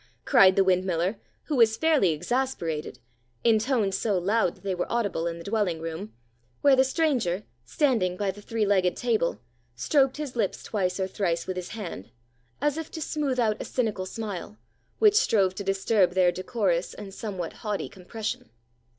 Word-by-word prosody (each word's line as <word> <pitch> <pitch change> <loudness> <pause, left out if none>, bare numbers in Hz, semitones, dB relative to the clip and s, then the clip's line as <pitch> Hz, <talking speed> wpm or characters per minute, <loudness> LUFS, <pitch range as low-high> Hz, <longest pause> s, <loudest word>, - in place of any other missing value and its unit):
cried 195 -8 +6
the 195 - +5
windmiller, 185 +1 +1 0.2
who 300 - -2
was 225 -3 +4
fairly 310 - +3
exasperated, 165 - -2 0.5
in 225 -2 +5
tones 220 -5 0
so 200 -1 0
loud 195 +1 +1
that - - -23
they 195 -1 -1
were 180 - -3
audible 205 -8 0
in 170 0 -3
the 170 - -9
dwelling 200 -5 0
room, 165 +6 -6 0.5
where 280 -2 +6
the 260 - +5
stranger, 260 - 0 0.2
standing 185 - +1
by 200 -1 0
the 205 +2 -13
three 225 0 -1
legged 190 -3 +2
table, 225 -8 0 0.4
stroked 270 - +2
his 295 -4 -5
lips 215 -5 -1
twice 185 -3 -1
or 190 - +1
thrice 175 -3 -1
with 185 - -3
his 180 -1 -5
hand, 165 - -6 0.5
as 295 +1 +1
if 320 - -6
to - - -7
smooth 290 -4 -1
out 215 -3 +1
a - - -2
cynical 210 -7 -2
smile 210 -1 -6 0.4
which 425 -2 +5
strove 200 - +3
to 200 - -5
disturb 195 -1 +2
their 180 -1 +4
decorous 185 -2 -1
and 200 -2 -9
somewhat 190 -6 -5
haughty 210 -2 -2
compression. 210 +4 -6
200 Hz, 175 wpm, -26 LUFS, 180-235 Hz, 0.5 s, cried